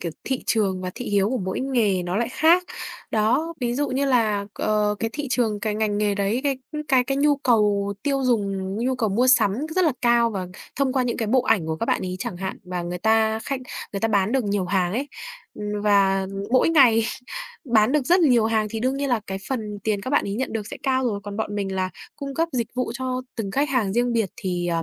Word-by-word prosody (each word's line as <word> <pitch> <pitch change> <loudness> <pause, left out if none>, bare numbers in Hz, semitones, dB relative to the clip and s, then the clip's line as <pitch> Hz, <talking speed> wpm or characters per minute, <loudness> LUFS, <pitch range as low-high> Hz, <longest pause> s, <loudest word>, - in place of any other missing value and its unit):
kiểu, 170 -3 -4
thị 265 -1 -2
trường 195 -5 +1
và 180 - -3
thị 250 - -6
hiếu 200 0 +3
của 260 - 0
mỗi 190 +3 -3
nghề 225 -9 +1
nó 180 +2 -2
lại 235 +1 0
khác. 335 +4 +4 0.5
Đó, 235 +10 +1
ví 240 -1 0
dụ 290 +2 0
như 275 +2 0
là, 215 -6 +2
ờ, 210 -1 +1
cái 225 0 -2
thị 295 -1 -4
trường, 220 -5 +1
cái 215 -1 -1
ngành 210 -1 0
nghề 205 -1 +1
đấy, 205 +5 0
cái 275 -2 0 0.3
cái 260 -3 +4
cái 270 +1 -1
nhu 290 0 +3
cầu 210 -6 +2
tiêu 275 -2 0
dùng, 195 -5 0
nhu 255 +2 0
cầu 225 -4 0
mua 235 +6 +2
sắm 230 -6 +5 0.2
rất 370 - +4
là 310 - +3
cao. 235 -1 +4
Và 190 -3 -4 0.3
thông 270 -2 +1
qua 260 -2 +2
những 240 -1 -1
cái 225 - -2
bộ 255 +1 +3
ảnh 195 -10 +2
của 160 - -2
các 230 - -3
bạn - - +1
ấy 185 0 -4
chẳng 215 -4 -4
hạn, 190 +1 -5
và 180 -1 -4
người 175 +1 -4
ta 220 +1 +2
khách, 270 -2 -3 0.3
người 195 - -3
ta 225 - +1
bán 205 +1 +2
được 265 -4 +1
nhiều 200 -2 0
hàng 180 -1 0
ấy. 275 +5 -2 0.5
Ừm, 210 0 -4
và 195 -2 +3 0.2
mỗi 255 +5 +4
ngày 245 -8 +5 0.6
bán 230 0 +3
được 295 -4 +1
rất 360 +2 +5
nhiều 245 -8 +4
hàng 220 -1 +1
thì 225 -1 -4
đương 260 +2 0
nhiên 280 0 -1
là 240 -3 +1
cái 190 0 -4
phần 215 -6 -3
tiền 210 -2 0
các 255 +6 -5
bạn 290 - +3
ấy 200 - -3
nhận 260 +4 -2
được 215 -2 -3
sẽ - - -7
cao 260 -1 +1
rồi. 205 -3 -2
Còn 205 0 -6
bọn 210 -2 -3
mình 195 -2 -2
là 185 0 -1 0.3
cung 275 -1 -6
cấp 330 +2 +1
dịch 235 -3 -1
vụ 250 -2 -2
cho 255 0 -3
từng 210 -4 -3
khách 280 +7 +1
hàng 230 -8 +1
riêng 240 +1 +1
biệt 225 -5 0
thì, 175 -2 -2
ờ, 165 -1 0
220 Hz, 250 wpm, -23 LUFS, 200-255 Hz, 0.6 s, sắm